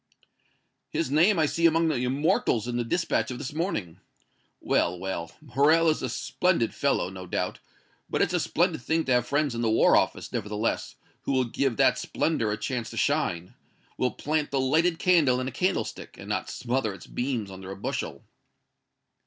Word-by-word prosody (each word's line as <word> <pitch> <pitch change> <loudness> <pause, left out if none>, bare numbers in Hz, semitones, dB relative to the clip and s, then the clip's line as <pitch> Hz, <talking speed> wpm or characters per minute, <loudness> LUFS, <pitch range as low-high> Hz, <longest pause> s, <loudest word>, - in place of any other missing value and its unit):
"His - - -2
name 170 +7 +4
I 160 - +3
see 165 +3 +3
among 165 0 +2
the 135 -6 0
immortals 125 -4 +1
in 120 - -3
the 120 - 0
dispatch 170 +9 0
of 125 - -5
this 140 +1 -6
morning. 105 - -3 0.6
Well, 90 +1 +1
well, 90 -2 -4
Morrel 155 +4 +3
is 155 - -3
a - - -2
splendid 175 -12 0
fellow, 90 - 0
no 95 -1 -8
doubt, - - -2 0.5
but - - -1
it's - - +2
a - - +2
splendid - - 0
thing 160 +5 0
to 130 - -1
have 125 -1 +3
friends 145 -2 +1
in 115 - -3
the 115 - +1
War 110 - +5
Office, - - +1
nevertheless, 105 +2 -2 0.3
who - - -2
will 130 -1 +3
give 125 +1 -1
that - - +4
splendor 115 -10 0
a 105 - -1
chance 120 +1 -3
to - - -9
shine 85 +1 0 0.4
will 125 - +1
plant 150 +2 -2
the 140 - 0
lighted 160 +6 +2
candle 160 -10 +3
in 130 - -2
a - - -3
candlestick, 185 +8 -2
and - - -10
not - - -2
smother 120 -4 -2
its 90 - -12
beams 120 -6 -3
under 95 0 -9
a 95 - -5
bushel." 100 - -4
130 Hz, 185 wpm, -27 LUFS, 110-155 Hz, 0.6 s, War